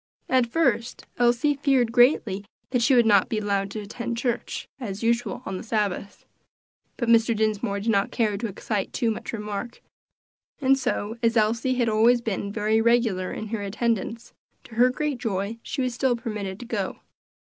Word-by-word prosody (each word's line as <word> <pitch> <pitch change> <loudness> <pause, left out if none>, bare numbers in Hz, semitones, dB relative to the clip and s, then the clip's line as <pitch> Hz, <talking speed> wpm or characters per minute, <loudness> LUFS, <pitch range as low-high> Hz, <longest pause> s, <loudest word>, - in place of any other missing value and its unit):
At 255 -2 +3
first 235 -4 0
Elsie 245 +4 +3
greatly 245 -4 +4
feared - - -22 0.3
that 250 -2 +1
she 260 +3 +4
would 240 -2 +5
not 205 -1 +4
be 225 - -1
allowed 200 -2 0
to 215 +1 -5
attend 235 +3 -5
church, 240 0 -2
as 210 -4 -5
usual, 235 +2 0
on 190 - -4
the - - -7
Sabbath. 205 -3 -2 0.7
But 235 - -2
Mr. 230 0 +4
Dinsmore 210 -2 0
did 225 +2 +1
not 200 -2 +2
care 215 -3 0
to 225 +3 -3
excite 205 0 -3
too 235 -3 +1
much 220 - -5
remark, 210 +1 -5 0.8
and 270 -2 +4
so, 225 -4 -2
as 230 0 +2
Elsie 230 +4 +2
had 245 -2 +1
always 225 +3 +4
been 205 -3 -3
very 215 +1 +1
regular 225 -6 +2
in 215 - -5
her 225 -1 -3
attendance, 225 +2 -2 0.3
to - - -15
her 245 +3 +5
great 285 0 -2
joy 205 +1 -2
she 265 - -3
was 250 -1 -1
still 245 0 +1
permitted 210 -5 -5
to - - -7
go. 210 -5 -3
230 Hz, 180 wpm, -25 LUFS, 210-240 Hz, 0.8 s, would